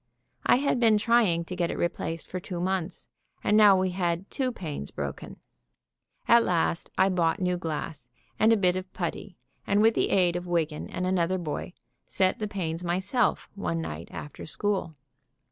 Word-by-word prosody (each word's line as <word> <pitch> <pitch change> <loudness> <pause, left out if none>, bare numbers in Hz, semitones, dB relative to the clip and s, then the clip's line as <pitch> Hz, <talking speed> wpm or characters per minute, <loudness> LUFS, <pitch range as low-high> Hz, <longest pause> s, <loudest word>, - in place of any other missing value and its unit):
I - - +7
had 265 -1 +1
been 225 -3 +5
trying 210 -7 +3
to 180 - -6
get 175 -1 0
it - - -3
replaced 165 -1 -2
for 185 - -4
two 180 -1 -6
months; 185 -1 -2 0.4
and 210 - +3
now 205 -3 +7
we 185 0 0
had 175 0 -2
two 260 -2 -1
panes 155 - -6
broken. - - -6 0.9
At 235 0 +6
last 170 -2 0
I 190 - +5
bought 170 -3 +1
new 180 -1 +1
glass 155 -5 -5 0.3
and 220 +1 +5
a 225 - +5
bit 180 -3 +2
of 185 0 -5
putty 180 +1 -4 0.3
and 200 - +3
with 225 +1 +5
the - - +1
aid 180 -2 +3
of 175 0 -4
Wiggan 160 -3 -1
and 180 - -3
another 185 0 +1
boy, 175 +1 -4 0.3
set 185 -1 +1
the 215 - -2
panes 175 -4 -3
myself 190 +8 0
one 185 -4 -2
night 80 - -5
after 150 - -8
school. 190 -2 -1
180 Hz, 180 wpm, -27 LUFS, 170-200 Hz, 0.9 s, I